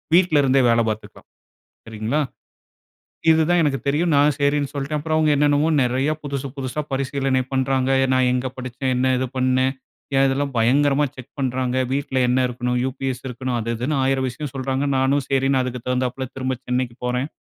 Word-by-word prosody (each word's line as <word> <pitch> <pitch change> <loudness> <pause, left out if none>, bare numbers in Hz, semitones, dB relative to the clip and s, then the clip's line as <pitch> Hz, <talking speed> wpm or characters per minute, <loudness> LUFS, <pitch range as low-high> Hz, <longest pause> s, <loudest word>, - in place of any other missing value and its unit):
வீட்லருந்தே 145 -7 +4
வேலை 115 0 +3
பார்த்துக்கலாம். 110 0 -7 0.6
சரிங்களா? 115 +7 -1 1.1
இது 160 - +4
தான் 175 - +4
எனக்கு 140 -3 0
தெரியும். 160 +4 +1
நான் 145 +1 +4
சரின்னு 145 0 +1
சொல்ட்டேன். 145 +1 -2
அப்பறம் 155 +1 -1
அவங்க 155 -1 +3
என்னென்னமோ 145 +2 +3
நெறைய 130 +4 +1
புதுசு 140 -1 -4
புதுசா 130 +2 -3
பரிசீலனை 135 -1 0
பண்றாங்க. 130 0 +1
எ - - +3
நா 130 - +3
எங்க 125 +1 -1
படிச்சேன்? 130 +1 -3
என்ன 130 +1 +2
இது 130 - 0
பண்னேன்? 130 +1 +2 0.4
ஏன் 135 - +5
இதெல்லாம் 140 +1 -1
பயங்கரமா 140 +5 +3
செக் 130 -2 -12
பண்ணுறாங்க. 130 -1 -1 0.2
வீட்ல 140 -1 -2
என்ன 125 +1 +2
இருக்கணும்? 125 0 -2
யுபிஎஸ் 130 0 -3
இருக்கணும், 125 0 -3
அது 115 +1 -2
இதுன்னு 130 +6 -1
1000 130 0 +1
விஷயம் 130 +2 -7
சொல்றாங்க. 135 +1 -1
நானும் 135 +1 +1
சரின்னு 135 -1 +2
அதுக்கு 125 -1 -4
தகுந்தாப்புல 125 +1 -1
திரும்ப 130 -1 -2
சென்னைக்கு 125 -1 -1
போறேன் 125 +2 -1
130 Hz, 165 wpm, -22 LUFS, 125-140 Hz, 1.1 s, ஏன்